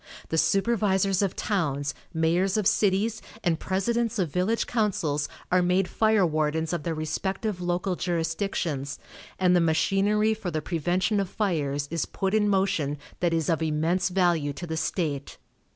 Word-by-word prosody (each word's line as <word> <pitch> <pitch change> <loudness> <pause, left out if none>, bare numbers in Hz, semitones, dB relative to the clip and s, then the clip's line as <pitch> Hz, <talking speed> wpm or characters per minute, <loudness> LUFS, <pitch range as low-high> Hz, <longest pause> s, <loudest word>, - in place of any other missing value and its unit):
The 160 - -1
supervisors 195 -2 +2
of 195 -2 0
towns, 145 -7 -1 0.2
mayors 175 +5 +1
of 210 - 0
cities 210 +1 +2 0.2
and 165 -3 +1
presidents 230 +5 0
of 175 -7 0
village 190 +6 +1
councils 160 -10 0 0.2
are 180 0 +4
made 180 +1 +2
fire 215 -2 +3
wardens 155 +1 0
of 170 - -1
their 165 +1 -2
respective 185 +5 -2
local 180 +1 -1
jurisdictions, 165 -5 -2 0.4
and 180 -1 +3
the 175 - +4
machinery 195 +6 +2
for 215 -4 -4
the 155 -2 -1
prevention 180 +6 0
of 195 -2 -1
fires 145 -8 -1
is 165 -2 -1
put 195 0 -2
in 210 -1 +3
motion 190 -7 +1 0.2
that 175 -1 +1
is 165 -2 0
of 165 -2 +1
immense 160 +4 +1
value 175 -6 +1
to 175 - -6
the 160 -1 -4
state. 155 -3 -2
180 Hz, 155 wpm, -26 LUFS, 160-195 Hz, 0.4 s, are